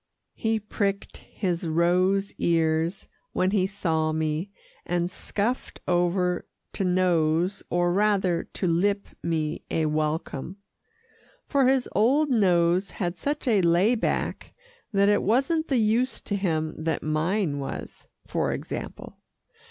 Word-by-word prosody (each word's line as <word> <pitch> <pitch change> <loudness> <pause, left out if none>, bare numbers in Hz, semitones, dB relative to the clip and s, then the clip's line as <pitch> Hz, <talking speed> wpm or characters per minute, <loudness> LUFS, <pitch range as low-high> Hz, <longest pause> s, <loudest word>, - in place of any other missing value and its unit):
He 220 0 0
pricked 200 -1 -2
his 175 -4 -3
rose 180 +4 +2
ears 165 +1 +1 0.3
when 185 +1 +1
he 195 -3 +2
saw 160 -5 0
me, 155 +3 -1 0.3
and 175 0 -1
scuffed 220 +7 -3
over 180 0 +1 0.3
to - - -1
nose, 180 0 +2
or 175 0 +1
rather 195 -4 +2
to - - -5
lip 200 +4 +1
me 160 -1 -2
a 160 - 0
welcome, 155 +2 -2 0.9
for 275 -3 +2
his 265 -1 +2
old 275 +8 +3
nose 180 -4 +3
had 175 -3 -3
such 290 +8 -3
a 215 -5 +4
lay 175 +6 +4
back 235 - -2 0.4
that 200 -1 +3
it 205 0 +4
wasn't 275 - +1
the 270 - +1
use 230 +4 +1
to 205 - -3
him 160 -5 -1
that 160 0 -1
mine 155 +1 0
was, 135 - -7 0.2
for - - -1
example. - - -7
185 Hz, 130 wpm, -26 LUFS, 165-205 Hz, 0.9 s, a